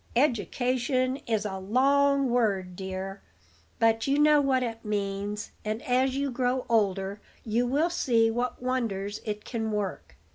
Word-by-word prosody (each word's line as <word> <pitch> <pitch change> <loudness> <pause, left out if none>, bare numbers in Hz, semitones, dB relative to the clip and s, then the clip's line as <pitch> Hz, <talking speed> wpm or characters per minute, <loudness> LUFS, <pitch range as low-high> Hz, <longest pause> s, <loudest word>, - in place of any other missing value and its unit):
"Education 255 +1 +1
is 220 -2 0
a 190 -2 -3
long 275 +5 +3
word, 195 -7 +1
dear; 190 +1 -5 0.6
but 225 +1 +2
you 275 +1 +2
know 300 0 +5
what 265 -2 +2
it 225 -2 -5
means, 205 0 -3
and, 215 +1 -2
as 260 +1 +1
you 280 -1 -1
grow 250 +1 0
older, 200 -2 +1 0.2
you 235 +2 0
will 300 +7 +1
see 230 -9 +2
what 245 +2 -2
wonders 215 -6 -2
it 210 -1 -4
can 225 -2 -3
work. 205 -3 -4
230 Hz, 145 wpm, -28 LUFS, 205-255 Hz, 0.6 s, know